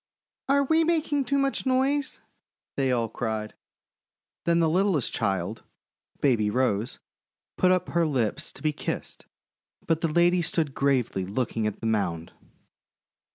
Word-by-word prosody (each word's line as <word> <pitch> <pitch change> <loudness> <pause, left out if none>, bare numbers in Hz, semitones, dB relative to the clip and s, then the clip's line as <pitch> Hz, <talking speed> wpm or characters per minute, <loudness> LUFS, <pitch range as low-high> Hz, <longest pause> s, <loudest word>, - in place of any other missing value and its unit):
"Are 280 +1 +4
we 320 +4 +3
making 310 -4 +1
too 280 - +1
much 275 0 0
noise?' 270 +2 +1 0.5
they 135 -2 +1
all 120 -2 +1
cried. 110 -1 -3 0.9
Then 170 0 +3
the 165 - +3
littlest 175 - +1
child, 100 0 -1 0.6
Baby 115 -7 +3
Rose, 115 -2 0 0.6
put 185 - +3
up 185 -1 +1
her 170 -1 +2
lips 125 -8 -1
to - - -14
be 155 -1 +1
kissed, - - -5 0.6
but 165 0 +1
the 165 - +2
lady 175 +3 +3
stood 160 -3 -1
gravely 130 -9 +1
looking 110 +2 -1
at 105 - -5
the - - -5
mound. 90 -7 -1
145 Hz, 140 wpm, -26 LUFS, 110-185 Hz, 0.9 s, Are